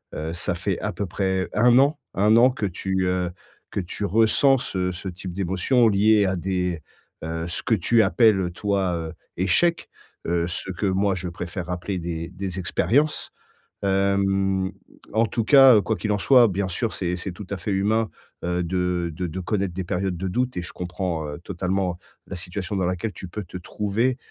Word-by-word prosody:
heu, 80 +1 -4
ça 85 - -2
fait - - -1
à - - -2
peu 100 - -3
près 95 +1 -1
1 120 +3 +5
an 145 +2 +3 0.2
1 105 +3 +5
an 125 +2 +7
que 110 -4 -3
tu, 95 0 -1
heu, 90 -1 0 0.4
que 100 - -1
tu 90 +3 -4
ressens 115 +6 +4
ce 90 -5 -2
ce 95 +2 -6
type 90 0 -7
d'émotions 100 +6 +2
liées 105 +1 +4
à 95 -1 0
des, 90 -2 -1 0.4
heu, 80 +1 -3
ce 85 - -4
que 115 - +2
tu 110 +5 +3
appelles 100 -7 +3
toi, 95 -3 0
heu, 80 -1 -5 0.2
échecs. 170 - +2 0.4
Heu, 85 0 +1
ce 90 +2 -5
que 100 +3 -2
moi 95 +1 +2
je 90 -1 -4
préfère 90 +1 -6
appeler 90 +1 -3
des 85 -1 -4
des 95 0 -5
expériences. 145 - +1 0.5
Hem, 95 -1 +1 0.4
en 110 +1 +3
tout 115 +1 -1
cas, 135 0 +8
heu, - - +4
quoi 110 - -1
qu'il 105 - -2
en 105 - +1
soit, 125 +2 +6
bien 100 -1 -1
sûr, 105 +5 -2
c'est 90 -1 -2
c'est 90 +1 -5
tout 95 +2 -9
à 100 - -3
fait 95 +4 -3
humain, 105 +3 +1 0.3
heu, 90 0 0
de 90 -1 -1
de 90 - -3
de 85 +2 -4
connaître 95 0 -1
des 95 - -3
périodes 90 +1 -2
de 95 +2 -3
doute 125 +6 -1
et - - -1
je 90 - -9
comprends, 90 -3 -3
heu, 75 - -6
totalement 90 0 -2 0.3
la 95 - -6
situation 90 +2 -5
dans 95 -2 0
laquelle 90 +4 -2
tu 90 - -8
peux 105 +4 -6
te 90 - -8
trouver. 105 +7 -1
95 Hz, 200 wpm, -24 LUFS, 90-105 Hz, 0.5 s, cas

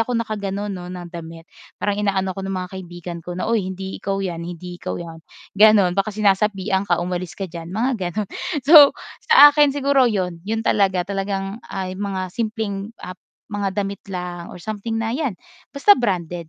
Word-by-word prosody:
ako 230 0 0
nakagano'n, 205 -1 -3
'no, 180 -2 -7
na 180 -1 -7
damit, 165 -1 -9 0.4
parang 205 0 0
ina-ano 195 -2 0
ako 195 - -5
ng 195 - -2
mga - - -10
kaibigan 175 -1 -7
ko 175 0 -6
na, 185 - -2
"Uy, 215 -5 +1
hindi 190 +1 -7
ikaw 195 0 -2
'yan. 170 -3 -4
Hindi 175 +1 -7
ikaw - - -4
'yan," 165 -1 -9 0.4
gano'n. 205 -3 +6
"baka 195 +2 +1
sinasapian 200 -1 +1
ka, 175 - +3
umalis 180 0 -4
ka 195 - -3
diyan." 165 0 -8
mga 240 +6 0 0.2
gano'n. 210 +1 -3 0.4
So, 295 -3 +10 0.4
sa 290 - +11
akin 290 -1 +4
siguro 280 -1 +3
'yon, 180 -5 -2
'yon 225 +2 -1
talaga. 190 -3 +2
Talagang, 195 +1 -3
ah, 190 -1 -3
'yong 185 +2 -6
mga 195 -2 -2
simpleng, 215 -3 -3
ah, 180 - -7 0.4
mga 205 -1 -1
damit 200 0 -5
lang 180 -1 -5
or - - -10
something 215 +1 -4
na 225 0 -1
'yan 275 -8 -1 0.4
basta 345 +9 +6
branded 175 -7 -2
195 Hz, 185 wpm, -21 LUFS, 180-215 Hz, 0.4 s, sa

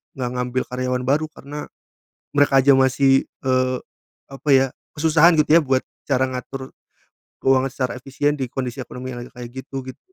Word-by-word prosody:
nggak 125 -2 -2
ngambil 125 +1 -1
karyawan 125 0 -1
baru 145 +5 +1
karena, 150 -1 -8 0.6
mereka 140 -2 +4
aja 140 0 +6
masih, 135 +1 +4 0.2
eee, 130 -1 +1 0.5
apa 135 +2 -3
ya, 135 0 +5 0.3
kesusahan 160 +2 +5
gitu 150 +2 +6
ya - - +4
buat 130 -2 +1 0.2
cara 130 -2 +2
ngatur 130 +1 -6 0.7
keuangan 135 0 +3
secara 130 -1 -2
efisien 140 +3 -1
di 135 -3 -3
kondisi 130 0 -4
ekonomi 125 +2 -7
yang 120 - -6
lagi - - -12
kayak 120 -1 -9
gitu, 135 0 -6
gitu. 130 - -9
130 Hz, 165 wpm, -22 LUFS, 130-140 Hz, 0.7 s, aja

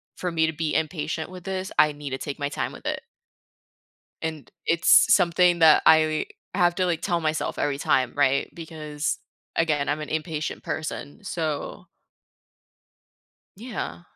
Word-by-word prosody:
for 180 -1 -3
me 160 -1 +2
to 160 - -2
be 155 0 -2
impatient 160 0 -2
with 180 -1 -10
this. 190 0 -3
I 150 - +6
need 145 -1 -7
to 130 - -2
take 145 +2 -5
my 145 0 -1
time - - -3
with - - -13
it." - - -2 1.2
And 160 -3 -5 0.2
it's 170 0 +6
something 175 -1 +4
that 160 -2 +7
I 155 -1 +4 0.3
have 175 -2 +3
to, 185 0 +1
like, 170 -2 -1
tell 175 -3 0
myself 155 0 -1
every 145 -1 0
time, 130 -3 +1
right, 140 -1 +2
because, 155 -2 -4 0.4
again, 150 -3 +1
I'm 150 +1 -1
an 150 - -6
impatient 155 -1 -3
person, 155 +4 -5
so 160 -6 -3 1.7
Yeah. 220 -5 -6
160 Hz, 155 wpm, -25 LUFS, 150-175 Hz, 1.7 s, that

